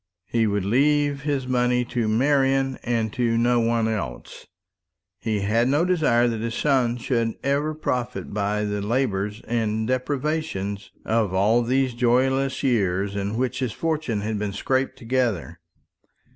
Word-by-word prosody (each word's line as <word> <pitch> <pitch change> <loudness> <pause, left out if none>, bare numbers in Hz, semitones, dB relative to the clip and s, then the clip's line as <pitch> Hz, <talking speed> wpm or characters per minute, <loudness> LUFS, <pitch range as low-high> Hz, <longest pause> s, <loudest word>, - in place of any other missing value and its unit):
He 115 +2 +1
would 100 -2 -1
leave 145 +5 +2
his 140 -3 -1
money 125 -1 +1
to 120 -2 -1
Marian, 135 +2 +2
and 115 -2 -1
to 115 -2 +1
no 120 +1 +3
one 115 -1 +1
else. 100 - -5 0.7
He 110 -2 -1
had 115 +4 +2
no 145 +6 +2
desire 150 -10 +3
that 115 -2 -2
his 115 0 -3
son 130 -5 +1
should 115 -2 -1
ever 145 +3 0
profit 125 -8 -3
by 105 0 0
the 105 0 -2
labours 105 -3 -1
and 110 -2 -1
deprivations 130 -6 -2 0.2
of 110 -4 +1
all 105 +5 +3
those 130 +1 +1
joyless 130 +3 +1
years 100 -5 +1
in 100 +2 -2
which 130 +1 -1
his 125 -4 -2
fortune 155 -10 -1
had 105 0 -2
been 105 -1 -3
scraped 130 +6 -1
together. 115 -9 -1
120 Hz, 145 wpm, -24 LUFS, 105-135 Hz, 0.7 s, no